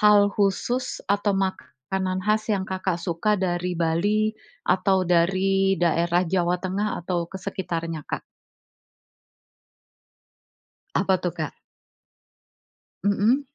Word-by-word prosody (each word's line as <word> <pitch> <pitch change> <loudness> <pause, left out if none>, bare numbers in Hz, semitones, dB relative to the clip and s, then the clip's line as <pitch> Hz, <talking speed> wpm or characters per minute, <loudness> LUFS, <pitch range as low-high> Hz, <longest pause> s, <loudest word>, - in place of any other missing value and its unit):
hal 210 -1 +7 0.2
khusus 210 +5 +1 0.3
atau 205 0 0
makanan 185 +4 -3
khas 215 +1 +2
yang 190 - -1
Kakak 185 -1 -1
suka 170 +5 0
dari 180 -2 -1
Bali 205 +7 +2 0.3
atau 190 +1 +2
dari 195 +3 +3
daerah 170 +1 +3
Jawa 180 -1 +2
Tengah 195 +3 -1 0.2
atau 175 +1 -1
ke 190 - -21
sekitarnya, 165 -3 -3
Kak? - - -3 2.7
Apa 190 0 +3
tuh, 175 - -1
Kak? 155 -2 -5 1.5
Mmm. 205 +6 +3
190 Hz, 100 wpm, -25 LUFS, 175-200 Hz, 2.7 s, hal